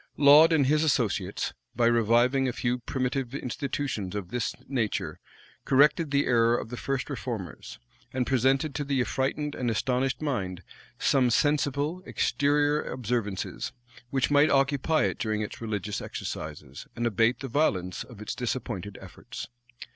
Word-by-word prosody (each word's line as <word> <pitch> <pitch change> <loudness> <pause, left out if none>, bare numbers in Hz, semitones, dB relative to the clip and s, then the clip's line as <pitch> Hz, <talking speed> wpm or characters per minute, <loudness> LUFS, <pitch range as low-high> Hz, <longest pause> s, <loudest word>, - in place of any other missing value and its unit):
Laud 150 +3 +8
and 155 -4 +4
his 150 +3 +3
associates, 105 -10 0 0.2
by 120 +1 +2
reviving 120 +3 +3
a - - 0
few 120 +1 -1
primitive 130 +1 -2
institutions 130 - -3
of 100 -4 -4
this 120 -1 -2
nature, 120 -6 -2 0.4
corrected 150 +4 +4
the 140 0 +2
error 115 -1 +3
of - - -5
the 125 - -5
first 135 +1 -2
reformers, 115 - -6 0.3
and 130 -1 -1
presented 135 +4 +2
to 145 - -2
the 140 -1 0
affrightened 140 +4 -1
and 125 -2 -2
astonished 125 +3 0
mind 95 - -3 0.3
some 130 -3 +3
sensible, 145 +5 +1
exterior 145 +1 +2
observances, 115 -4 -3 0.4
which 135 +1 0
might 145 +2 +5
occupy 140 +3 +2
it - - -1
during 110 -1 -1
its 105 - -7
religious 105 -2 -3
exercises, 75 -3 -6
and 120 - -2
abate 115 +3 +2
the 135 - -4
violence 95 - 0
of 120 -5 -14
its 105 - -4
disappointed 110 -5 -4
efforts. 95 +6 -9
125 Hz, 145 wpm, -27 LUFS, 110-140 Hz, 0.4 s, Laud